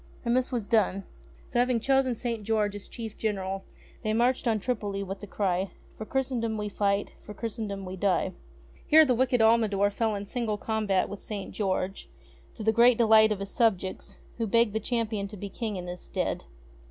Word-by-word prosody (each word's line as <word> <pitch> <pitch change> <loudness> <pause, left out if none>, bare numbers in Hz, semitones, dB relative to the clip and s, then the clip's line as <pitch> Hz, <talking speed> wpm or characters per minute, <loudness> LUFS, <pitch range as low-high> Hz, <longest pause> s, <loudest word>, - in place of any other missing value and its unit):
And 235 +1 +2
this 255 +1 +1
was 235 -5 -1
done. 200 -3 +2 0.4
So, 240 - -1
having 245 -1 +3
chosen 265 0 +2
St. 230 -1 -3
George 210 -1 +1
as 205 - -8
Chief 225 -2 -8
General 195 -3 -2 0.4
they 215 -2 -1
marched 245 +3 +2
on 220 -2 +2
Tripoli 205 -3 -2
with 195 0 -6
the 205 - -9
cry: 190 -1 0 0.3
"For 220 - -7
Christendom 245 -4 -1
we 210 0 -3
fight, 200 0 0
For 210 - -10
Christendom 210 -3 -4
we 185 +1 -6
die." 185 -1 +1 0.5
Here 315 0 +8
the 255 - +3
wicked 250 0 +2
Almldor 215 -3 +4
fell 220 +1 0
in 200 0 -4
single 225 -1 -2
combat 210 -3 0
with 200 - -7
St. 205 -3 -6
George, 195 -1 -2 0.5
to 220 - -6
the 220 - +4
great 235 +1 +5
delight 220 -1 +6
of 200 -2 -1
his 200 - -5
subjects, 195 -6 0 0.2
who 225 - 0
begged 230 0 +3
the 220 - 0
Champion 220 -3 -2
to 205 +1 -10
be 200 +1 -6
King 220 +1 -4
in 180 -1 -5
his 180 0 -6
stead. - - -3
215 Hz, 195 wpm, -28 LUFS, 200-235 Hz, 0.5 s, Here